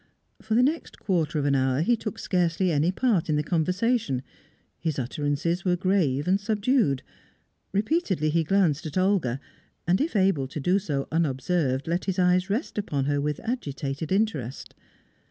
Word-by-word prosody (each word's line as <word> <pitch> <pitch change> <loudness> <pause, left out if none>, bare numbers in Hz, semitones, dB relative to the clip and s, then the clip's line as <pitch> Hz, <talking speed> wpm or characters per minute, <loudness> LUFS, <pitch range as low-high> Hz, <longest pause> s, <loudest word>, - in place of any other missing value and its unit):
For 220 0 -1
the 245 - +5
next 310 +5 -1
quarter 165 -5 0
of 145 - 0
an 140 - +2
hour, 130 +1 +2
he 240 +7 +3
took 220 -1 -5
scarcely 180 -1 +1
any 155 +3 +2
part 200 -6 +1
in 155 - +2
the 150 - +1
conversation; 180 - 0 0.6
his 160 -3 -2
utterances 145 +6 -1
were 180 -2 +2
grave 175 -7 +1
and 190 +2 +3
subdued; 210 - +1 0.7
repeatedly 200 - 0
he 165 +1 +2
glanced 165 -4 +1
at 155 - -5
Olga, 185 -10 +1 0.5
and, 180 +2 +2
if 305 -4 -1
able 190 -9 +2
to 145 - -6
do 180 +7 +2
so 145 -8 -3
unobserved, 145 -2 0
let 170 +2 -1
his 190 -1 -1
eyes 180 +1 +3
rest 215 +1 -2
upon 145 -9 -1
her 145 0 +1
with 150 0 -2
agitated 145 - -4
interest. 190 - -1
170 Hz, 165 wpm, -26 LUFS, 145-200 Hz, 0.7 s, the